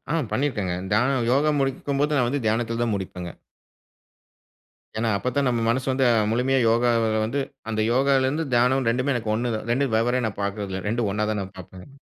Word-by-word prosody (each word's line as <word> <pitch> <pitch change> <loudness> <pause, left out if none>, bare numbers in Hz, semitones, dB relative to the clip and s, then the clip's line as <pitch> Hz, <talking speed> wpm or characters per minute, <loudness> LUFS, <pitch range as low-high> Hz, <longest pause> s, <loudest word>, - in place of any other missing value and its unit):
அ, - - +1 0.2
பண்ணிருக்கிறேங்க. 105 -8 -1 0.2
தியானம் 125 +1 +2
யோகா 145 +3 +3
முடிக்கும்போது 140 +2 0
நான் 125 -3 +2
வந்து 140 -1 -2
தியானத்துல 115 +1 0
தான் 115 -3 0
முடிப்பங்க. 90 -2 -5 1.7
ஏன்னா 115 0 0
அப்பத்தான் 130 +4 -1
நம்ம 120 -2 0
மனசு 130 +3 0
வந்து 130 0 +1 0.3
முழுமையா 130 +3 +1
யோகால 115 0 +2 0.2
வந்து, 140 +6 -1 0.3
அந்த 110 -1 -1
யோகாலருந்து 135 +3 +2
தியானம் 125 +1 +3
2மே 125 +4 0
எனக்கு 110 -3 -2
1 120 +1 -1
தான், 110 - -7
2 135 0 0
வெவ்வேற 120 +3 +1
நான் 105 -2 -5
பாக்குறது 100 0 -3
இல்ல 95 0 -4
2 115 -1 0
ஒன்னா 105 +2 -1
தான் 105 -2 -1
நான் 95 +1 -9
பாப்பேங்க. 95 +8 -12
120 Hz, 175 wpm, -24 LUFS, 110-135 Hz, 1.7 s, யோகா